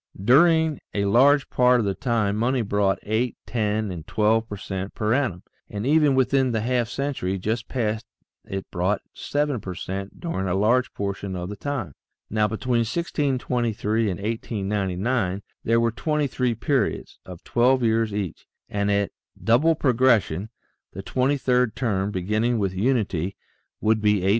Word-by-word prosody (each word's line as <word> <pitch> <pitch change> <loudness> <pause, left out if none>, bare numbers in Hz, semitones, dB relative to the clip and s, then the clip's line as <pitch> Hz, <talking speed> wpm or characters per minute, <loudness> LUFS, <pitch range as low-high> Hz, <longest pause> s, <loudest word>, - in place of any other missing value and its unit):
During 160 - +4 0.2
a 100 -1 +1
large 135 +7 +4
part 125 0 +4
of 110 - 0
the 100 - 0
time 110 -4 0
money 120 +3 +1
brought 100 -1 +1
eight, 110 +3 -1
ten, 110 -2 -1
and 85 -3 -7
twelve 110 +1 +1
per 105 - -5
cent 95 0 -5
per 110 +1 +1
annum, 120 -10 0 0.3
and 105 +2 -4
even 150 -1 +4
within 130 -1 +2
the 110 - 0
half 120 0 0
century 130 -9 -2
just 110 +5 -2
past 110 -2 -2 0.4
it 95 0 -5
brought 95 +3 0
seven 145 -5 -1
per 95 -1 -6
cent 95 +3 -6
during 130 - -3
a 90 - 0
large 120 +5 +2
portion 100 -1 -3
of 90 0 -4
the 105 - -5
time. 135 - -4 0.4
Now, 105 0 +2
between 120 +3 -1
1623 120 -5 0
and 90 - -3
1899, 100 -1 -1 0.2
there 115 +1 +3
are 115 - +2
23 130 -2 0
periods, 125 0 -1
of 90 -2 -11
12 125 +2 +2
years 115 -1 +2
each, 100 -4 -4 0.2
and 100 0 -1
at 100 -1 +1 0.3
double 145 +9 +4
progression 115 - +2 0.4
the 95 - -7
twenty 130 +7 +1
third 125 -3 +1
term, 100 -6 0
beginning 105 +5 0
with 100 -3 -1
unity, 100 -4 0 0.4
would 110 0 +2
be 105 -2 +3
8,388,608. 95 - +1
110 Hz, 155 wpm, -24 LUFS, 100-125 Hz, 0.4 s, During